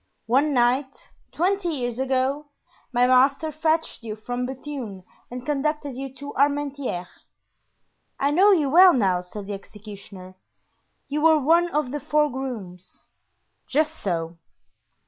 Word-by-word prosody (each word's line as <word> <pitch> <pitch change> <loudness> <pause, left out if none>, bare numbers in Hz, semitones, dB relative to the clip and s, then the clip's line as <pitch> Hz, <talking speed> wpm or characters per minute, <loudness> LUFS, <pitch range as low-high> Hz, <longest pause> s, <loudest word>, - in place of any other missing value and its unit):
"One 275 +6 +2
night, 260 +2 0 0.2
twenty 370 +1 0
years 245 -6 -3
ago, 265 +2 0 0.4
my 245 0 +3
master 270 +5 +3
fetched 315 -1 -1
you 220 -2 -6
from 245 +3 -4
Bethune 260 -7 -7 0.3
and 250 0 -7
conducted 295 0 -1
you 270 +1 -6
to 285 +1 -8
Armentieres." 280 -9 0 1.1
"I 280 +1 +2
know 375 +7 +5
you 320 -7 +3
well 360 +3 +8
now," 190 - +2
said 195 +3 -8
the 205 - -5
executioner; 200 -2 -11 0.7
"you 295 +1 -2
were 320 0 +6
one 335 +5 +3
of 295 -5 -1
the 295 - -3
four 300 +1 +1
grooms." 210 -9 -8 0.6
"Just 305 +2 +1
so." 170 -3 -3
270 Hz, 130 wpm, -24 LUFS, 225-300 Hz, 1.1 s, well